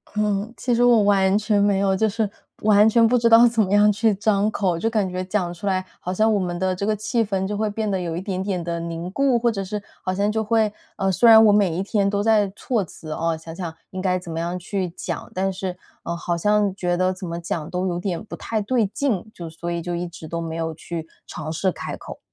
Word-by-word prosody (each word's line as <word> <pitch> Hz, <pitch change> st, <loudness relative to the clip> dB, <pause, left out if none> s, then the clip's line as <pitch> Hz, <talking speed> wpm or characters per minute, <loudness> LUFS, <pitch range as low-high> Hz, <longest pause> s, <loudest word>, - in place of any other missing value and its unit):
嗯， 210 Hz, +2 st, 0 dB
其 245 Hz, -1 st, 0 dB
实 240 Hz, +1 st, +3 dB
我 235 Hz, -4 st, +5 dB
完 195 Hz, -1 st, +3 dB
全 210 Hz, -1 st, +1 dB
没 200 Hz, -1 st, +3 dB
有， 195 Hz, -1 st, +2 dB
就 220 Hz, +3 st, +2 dB
是 220 Hz, 0 st, -1 dB, 0.4 s
完 210 Hz, 0 st, +6 dB
全 230 Hz, +1 st, +5 dB
不 250 Hz, +2 st, +3 dB
知 230 Hz, 0 st, +3 dB
道 230 Hz, +1 st, +8 dB
怎 230 Hz, -1 st, +1 dB
么 195 Hz, -1 st, 0 dB
样 210 Hz, 0 st, +6 dB
去 220 Hz, +1 st, +2 dB
张 205 Hz, 0 st, +1 dB
口。 185 Hz, -6 st, 0 dB
就 225 Hz, -, 0 dB
感 210 Hz, -4 st, 0 dB
觉 185 Hz, 0 st, -3 dB
讲 185 Hz, -3 st, -1 dB
出 200 Hz, +4 st, -6 dB
来， 185 Hz, -1 st, 0 dB
好 180 Hz, -, -4 dB
像 220 Hz, +3 st, +3 dB
我 205 Hz, -, +2 dB
们 175 Hz, -1 st, -2 dB
的 185 Hz, 0 st, 0 dB
这 200 Hz, -, -3 dB
个 215 Hz, 0 st, +1 dB
气 220 Hz, +3 st, 0 dB
氛 195 Hz, -2 st, -1 dB
就 205 Hz, 0 st, -3 dB
会 215 Hz, 0 st, 0 dB
变 215 Hz, 0 st, -2 dB
得 190 Hz, -2 st, 0 dB
有 170 Hz, -2 st, -3 dB
一 175 Hz, -, -3 dB
点 190 Hz, -1 st, -3 dB
点 190 Hz, -3 st, -2 dB
地 170 Hz, 0 st, -3 dB
凝 170 Hz, +2 st, -5 dB
固。 270 Hz, 0 st, +2 dB
或 235 Hz, 0 st, +2 dB
者 195 Hz, -2 st, -3 dB
是 205 Hz, +2 st, -4 dB, 0.2 s
好 185 Hz, -, -1 dB
像 200 Hz, +2 st, +1 dB
就 220 Hz, 0 st, -1 dB
会 220 Hz, -1 st, +2 dB, 0.2 s
呃， 195 Hz, 0 st, 0 dB
虽 230 Hz, +6 st, +5 dB
然 220 Hz, 0 st, +9 dB
我 210 Hz, -, +6 dB
每 200 Hz, -4 st, +3 dB
一 190 Hz, -, -1 dB
天 200 Hz, -1 st, +1 dB
都 200 Hz, 0 st, 0 dB
在 210 Hz, -3 st, +3 dB
措 230 Hz, -6 st, -1 dB
辞， 155 Hz, -2 st, -10 dB
哦， 165 Hz, 0 st, -1 dB
想 165 Hz, +1 st, -10 dB
想 170 Hz, -3 st, -5 dB, 0.2 s
应 185 Hz, -2 st, -5 dB
该 185 Hz, -1 st, +1 dB
怎 175 Hz, -2 st, -9 dB
么 165 Hz, -, -3 dB
样 175 Hz, +2 st, -2 dB
去 185 Hz, 0 st, -3 dB
讲。 165 Hz, -, -6 dB
但 190 Hz, +1 st, 0 dB
是， 185 Hz, -1 st, -5 dB, 0.3 s
嗯， 170 Hz, -, -3 dB
好 170 Hz, 0 st, -2 dB
像 210 Hz, +1 st, +2 dB
觉 180 Hz, -2 st, 0 dB
得 185 Hz, +1 st, +1 dB
怎 185 Hz, -1 st, -7 dB
么 170 Hz, +1 st, -4 dB
讲 165 Hz, -2 st, -4 dB
都 180 Hz, +1 st, -2 dB
有 175 Hz, -1 st, -2 dB
点 180 Hz, -1 st, -3 dB
不 -, -, -8 dB
太 220 Hz, -2 st, -2 dB
对 225 Hz, -1 st, +1 dB
劲， 220 Hz, -3 st, -2 dB
就 170 Hz, -2 st, -8 dB
所 170 Hz, +2 st, -6 dB
以 170 Hz, 0 st, -2 dB
就 175 Hz, +1 st, -4 dB
一 175 Hz, +1 st, -3 dB
直 165 Hz, -2 st, -10 dB
都 170 Hz, +1 st, -4 dB
没 165 Hz, -1 st, -4 dB
有 165 Hz, -1 st, -2 dB
去 165 Hz, 0 st, -6 dB, 0.2 s
尝 155 Hz, -, -6 dB
试 185 Hz, +3 st, 0 dB
开 -, -, -6 dB
口。 -, -, -10 dB
195 Hz, 285 characters per minute, -22 LUFS, 175-215 Hz, 0.4 s, 然